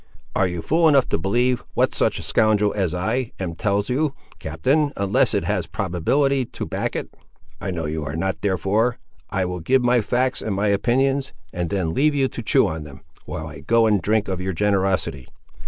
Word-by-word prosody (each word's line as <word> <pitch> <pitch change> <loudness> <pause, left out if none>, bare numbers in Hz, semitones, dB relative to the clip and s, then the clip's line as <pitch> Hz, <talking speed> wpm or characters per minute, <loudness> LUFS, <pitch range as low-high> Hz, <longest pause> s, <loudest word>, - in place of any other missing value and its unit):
"Are 95 - +3
you 90 -2 -4
fool 165 +2 +3
enough 140 -3 +4
to - - 0
believe 120 +7 +1
what - - +2
such - - +1
a - - -6
scoundrel 105 -1 +2
as 90 -4 0
I 115 +7 -1
am 90 -3 -3
tells 100 +4 0
you, 140 +3 0 0.2
captain, 140 - +1
unless 100 -1 +2
it - - +1
has - - -1
probability 135 - +1
to 115 - -6
back - - -3
it? - - -5 0.5
I - - -3
know 85 -3 -3
you 75 +1 -3
are 75 +1 -4
not: 95 +4 -2
therefore 105 +5 +1 0.3
I 95 -1 0
will 90 0 -4
give 130 +10 +2
my 120 -1 +3
facts 125 +4 0
and 105 -3 -2
my 100 +2 +1
opinions, 135 +7 +1 0.2
and 85 -1 -2
then 90 -5 -1
leave 150 - +2
you 135 -2 +2
to - - -6
chew 110 - +3
on 80 -1 -3
them, 70 -3 -12 0.2
while 80 - -5
I 75 -2 -9
go 115 +10 +3
and 105 -3 +3
drink 105 +3 +1
of 95 -1 -3
your 95 +1 -2
generosity. 95 -8 0
100 Hz, 205 wpm, -22 LUFS, 90-125 Hz, 0.5 s, enough